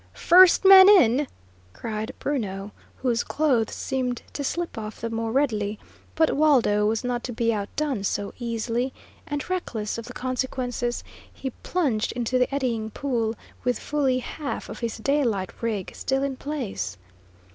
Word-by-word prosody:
"First 365 +2 +6
man 385 0 +10
in!" 280 - +5 0.5
cried 220 +1 -5
Bruno, 205 -8 -3 0.3
whose 240 -2 +1
clothes 265 -8 +1
seemed 255 -2 -2
to 285 - -3
slip 345 +5 -2
off 215 -1 -6
the 230 - -4
more 225 0 -2
readily; 220 -6 0 0.4
but 320 -1 +3
Waldo 250 -9 +4
was 225 +2 0
not 245 -1 -2
to 250 - -4
be 230 0 +1
outdone 220 +3 -2
so 200 0 -2
easily, 235 +2 -2 0.3
and, 290 -2 -3
reckless 230 - -3
of 230 - -8
the 250 - -9
consequences, 250 -1 -2 0.3
he 265 - -5
plunged 275 -12 0
into 245 +1 0
the 250 - +2
eddying 240 -6 -1
pool, 230 -3 -1 0.3
with 250 -2 +1
fully 275 -4 0
half 275 +3 -5
of - - -7
his 235 -2 -3
daylight 230 -7 0
rig 215 -5 -2
still 265 +1 -1
in 275 -1 -1
place. 225 - -4
245 Hz, 150 wpm, -25 LUFS, 220-280 Hz, 0.5 s, man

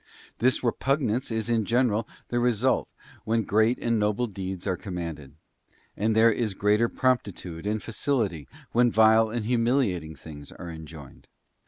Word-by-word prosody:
This 130 +1 +2
repugnance 125 0 0
is 110 -1 -2
in 115 -2 +1
general 115 0 +1 0.2
the 120 - 0
result, 120 +1 +1 0.3
when 115 0 +1
great 110 +5 +2
and 115 -1 0
noble 105 +3 +1
deeds 95 -4 -6
are 95 -2 0
commanded; 85 -7 -6 0.6
and 110 +2 0
there 115 +1 +6
is 110 -3 -2
greater 105 +4 +2
promptitude 100 -8 -1
and 105 0 -1
facility, 105 - -1 0.2
when 120 +1 +4
vile 110 0 +5
and 115 -1 -3
humiliating 115 - 0
things 75 -2 -11
are 85 -2 -8
enjoined. 80 -3 -11
110 Hz, 145 wpm, -26 LUFS, 95-120 Hz, 0.6 s, there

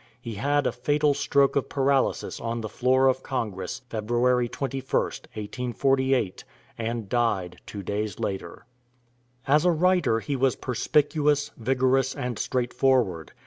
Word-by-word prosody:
He 120 -2 -6
had 145 +7 +1
a - - +2
fatal 145 +3 +1
stroke 140 -1 +2
of 140 - 0
paralysis 135 -1 0
on 115 0 -3
the 110 - -5
floor 130 +3 +2
of 130 0 +2
Congress 105 -10 -4
February 120 +2 +1
21st, 135 0 -4 0.5
1848, 125 +1 0 0.3
and 115 -1 -3
died 95 -6 -1
two 100 -1 -7
days 105 0 -3
later. 95 -1 -4 0.8
As 150 +2 +4
a 180 - +4
writer 175 -8 +3
he 140 +5 -3
was 135 -1 +2
perspicuous, 145 +3 +1
vigorous, 130 +2 +1
and 125 -5 -4
straightforward. 125 - 0
125 Hz, 130 wpm, -26 LUFS, 115-140 Hz, 0.8 s, As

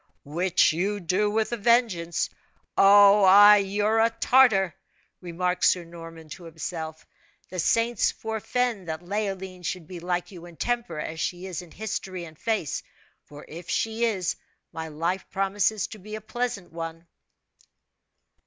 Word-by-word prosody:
"Which 170 +4 +2
you 200 +5 -1
do 190 +4 0
with 220 +2 0
a 240 - -1
vengeance! 210 -7 +1 0.5
Oh! 200 0 +8
you're 205 +2 +2
a 225 +1 +4
Tartar!" 230 - +4 0.5
remarked 180 +1 -2
Sir 180 - +4
Norman 165 -1 -11
to 170 +3 -10
himself. 160 -1 -6 0.4
"The 185 - -5
saints 230 +7 +2
forefend 220 -2 -2
that 160 +1 -5
Leoline 190 -1 -4
should 180 -1 -4
be 175 +2 -9
like 175 +2 -3
you 175 -2 -11
in 170 - -14
temper, 240 -5 -2
as 160 +1 -5
she 175 +2 -3
is 185 -2 -5
in 175 - -14
history 190 -3 -5
and 160 -1 -13
face; 215 -4 -2 0.4
for 145 0 -12
if 170 +2 -10
she 225 +1 0
is, 190 -6 -1 0.4
my 160 0 -6
life 165 +5 -3
promises 195 +1 0
to 215 - -10
be 215 +3 -8
a 215 - -7
pleasant 220 -5 -4
one." 165 0 -6
190 Hz, 145 wpm, -26 LUFS, 170-215 Hz, 0.5 s, Oh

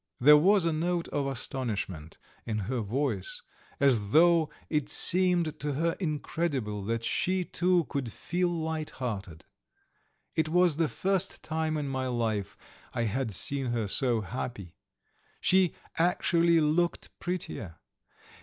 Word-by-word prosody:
There 150 +4 +8
was 185 +4 +4
a 165 - +1
note 170 +2 -1
of 140 -1 -1
astonishment 105 - -3 0.3
in 110 -2 -3
her 120 +5 -2
voice, 145 - -2 0.4
as 115 -7 +2
though 165 -1 +5 0.2
it 150 -2 -1
seemed 175 -3 +2
to 145 0 -2
her 165 +4 +1
incredible 145 - -2
that 115 +1 -2
she, 185 +9 0
too, 180 -1 +2
could 130 -2 -3
feel 175 +8 -1
light 160 -2 -3
hearted. 100 -10 -5 0.9
It 160 -1 +1
was 175 -2 +3
the 165 -1 +2
first 190 +8 -1
time 160 0 -1
in 145 -2 -2
my 130 -1 -2
life 115 -5 -2 0.4
I 120 - 0
had 115 +2 -1
seen 135 +7 -2
her 120 -2 -1
so 120 +2 +2
happy. 105 -4 -6 0.7
She 185 -2 +3 0.2
actually 170 -1 +3
looked 160 +3 +1
prettier. 160 - -4
150 Hz, 135 wpm, -29 LUFS, 120-170 Hz, 0.9 s, There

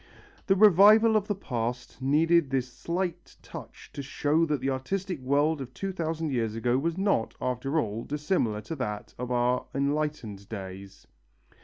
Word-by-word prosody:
The 195 - +4
revival 215 +3 +7
of 210 -1 +1
the 205 - 0
past 125 -7 -4
needed 155 +3 +3
this 130 -1 0
slight 175 +2 -4
touch - - -11
to 140 - -5
show 150 +4 +1
that 150 -2 0
the 135 +2 -1
artistic 180 +6 -3
world 145 +3 +1
of 130 - -7
two 195 0 -3
thousand 160 -3 -2
years 115 -4 -1
ago 120 +2 +1
was 165 +4 -1
not, 195 - 0
after 130 +5 -1
all, 110 -3 -3
dissimilar 145 - -1
to 115 +10 -6
that 105 -5 -4
of 125 0 -4
our 125 0 +1
enlightened 140 -8 -2
days. 95 -2 -8
140 Hz, 160 wpm, -28 LUFS, 120-170 Hz, -, revival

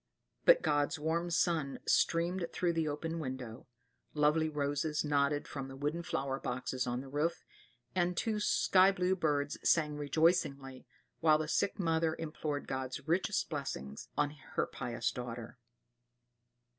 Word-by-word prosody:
But - - +7
God's 145 +1 +1
warm 165 +3 -1
sun 165 -5 +1
streamed 170 +1 +2
through 175 -1 0
the 165 -1 0
open 160 +3 -3
window; 130 -4 -6 0.5
lovely 150 +2 +3
roses 150 +1 -1
nodded 145 0 +1
from 135 -2 -5
the 135 - -9
wooden 150 +5 -2
flower 135 -4 -2
boxes 125 +1 -3
on 120 +1 -1
the 135 - -10
roof, 150 +5 -1 0.5
and 180 -1 +1
two 215 +1 0
sky 195 -2 +4
blue 185 -1 +1
birds 145 -5 0
sang 150 -3 +3
rejoicingly, 145 -3 +1 0.3
while 155 -2 +5
the 155 0 -3
sick 195 - 0
mother 165 -3 +1
implored 155 -2 -4
God's 130 +2 -4
richest 185 +5 +1
blessings 70 - -5
on 145 - +2
her 150 - -3
pious 120 -1 -3
daughter. 120 0 -7
150 Hz, 140 wpm, -33 LUFS, 135-165 Hz, 0.5 s, But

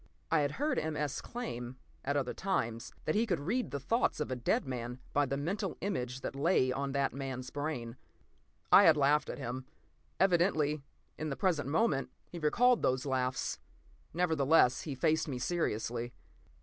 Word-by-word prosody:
I 165 - +4
had 145 0 0
heard 295 +4 0
M. 155 -1 -3
S. 145 -2 -2
claim, 130 - -6 0.3
at 140 +1 0
other 135 -3 -1
times, 115 -12 -2
that 155 - +1
he 225 +2 +2
could 175 -5 0
read 220 - -1
the 140 - -3
thoughts 230 - +1
of 150 - -2
a - - 0
dead 120 - 0
man 125 -1 -5
by 145 0 +3
the 140 +2 -1
mental 185 +7 -2
image 130 -10 -3
that - - -4
lay 140 -3 +3
on 135 +1 -2
that 140 -1 +1
man's 130 -2 -5
brain. 135 -5 -4 0.7
I - - +9
had 160 -2 +7
laughed 145 +1 +3
at - - -4
him. 130 +2 -5 0.5
Evidently, 170 -5 +3 0.4
in 155 0 -2
the 135 - -2
present 160 -8 +1
moment, 150 -4 +1 0.2
he 175 - -6
recalled 240 +11 +4
those 130 +1 +1
laughs. 130 -2 -1 0.5
Nevertheless, 160 -6 +3
he 145 -4 -5
faced 160 +5 +1
me 135 -4 -3
seriously. 120 -5 -2
145 Hz, 175 wpm, -32 LUFS, 130-165 Hz, 0.7 s, I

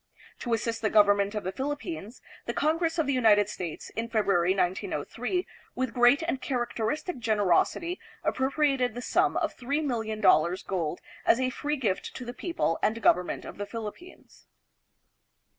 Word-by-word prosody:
To 235 -2 0
assist 230 +1 -3
the 215 - +1
gov 210 0 +6
ernment 205 +1 +2
of 210 - -2
the 185 - -2
Philippines, 285 - -5 0.2
the 235 - -2
Congress 325 +2 +1
of 320 - +2
the 280 - +1
United 210 -5 +4
States 175 -6 -6
in 230 +1 -4
February, 195 -5 +2
1903, 200 - -1 0.3
with 255 -2 -2
great 245 +5 +5
and 295 -6 -2
characteristic 255 +4 -2
generosity 220 - +1 0.2
appropriated 265 -3 +1
the 245 - -5
sum - - +2
of - - -1
$3,000,000, 220 - +1
gold, 175 -3 -2 0.2
as 235 - +4
a 255 0 +1
free 295 +3 -2
gift 210 -8 -2
to 250 - -6
the 245 - -5
people 330 - -1
and 220 +2 +1
government 180 -5 +2
of - - -9
the 205 - -3
Philippines. 230 - -9
230 Hz, 155 wpm, -28 LUFS, 205-275 Hz, 0.3 s, gov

